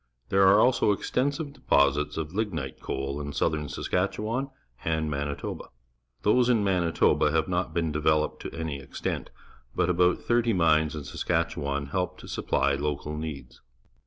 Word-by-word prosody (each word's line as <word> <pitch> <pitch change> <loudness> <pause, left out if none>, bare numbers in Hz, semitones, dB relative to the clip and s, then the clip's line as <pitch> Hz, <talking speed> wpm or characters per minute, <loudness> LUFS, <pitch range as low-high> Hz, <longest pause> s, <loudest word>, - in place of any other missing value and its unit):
There 95 0 +5
are 100 +2 +7
also 120 -3 +4
extensive 140 - -1
deposits 75 - +2
of 80 0 -4
lignite 85 -11 -3
coa 65 - -3
l 70 +2 -3
in 70 0 -5
southern 75 +1 0
Saskatchewan 110 +8 -1 0.3
and 80 -1 0
Manitoba. 70 0 -4 0.6
Those 120 +4 +4
in 115 -4 +3
Manitoba 85 -5 +2
have 80 0 +1
not 90 -2 -1
been 80 -1 0
developed 75 0 +1
to - - -6
any 80 -4 -4
extent, 70 - -4 0.5
but 90 - +2
about 90 0 +3
thirty 120 -1 +1
mines 80 -4 +3
in 75 - -5
Saskatchewan 70 0 -1
help 90 +6 -2
to - - -12
supplj 70 +1 0
local 75 +1 -2
needs. 70 -6 -7
80 Hz, 150 wpm, -27 LUFS, 75-100 Hz, 0.6 s, are